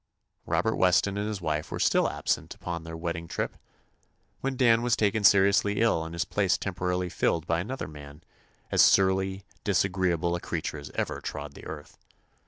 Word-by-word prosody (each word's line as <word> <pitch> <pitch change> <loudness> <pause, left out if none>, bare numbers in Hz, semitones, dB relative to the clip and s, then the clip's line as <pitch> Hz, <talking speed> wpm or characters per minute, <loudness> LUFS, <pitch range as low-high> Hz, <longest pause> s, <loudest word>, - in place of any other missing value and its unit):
Robert - - +1
Weston 95 +2 +3
and 105 +1 -2
his 105 -3 -4
wife 75 -2 -2
were - - -5
still - - +3
absent - - -2
upon 85 -2 -5
their 80 0 -7
wedding 85 0 -4
trip - - -3 0.8
when 135 -1 -3
Dan 115 -3 +4
was 120 -1 +2
taken 105 0 +1
seriously 100 +1 +4
ill 110 -8 +2
and 80 +1 -7
his 85 - -1
place 100 -3 +1
temporarily 90 -1 -2
filled 85 -1 0
by 85 -1 0
an 90 +6 -5
other 135 +1 -4
man, 75 -1 -12 0.5
as - - +5
surly, 95 0 +3 0.2
disagreeable 90 -3 +1
a - - -3
creature 80 -2 -4
as 70 - -9
ever - - -2
trod 75 -1 -6
the - - -12
earth. 75 -2 -9
90 Hz, 180 wpm, -27 LUFS, 80-100 Hz, 0.8 s, as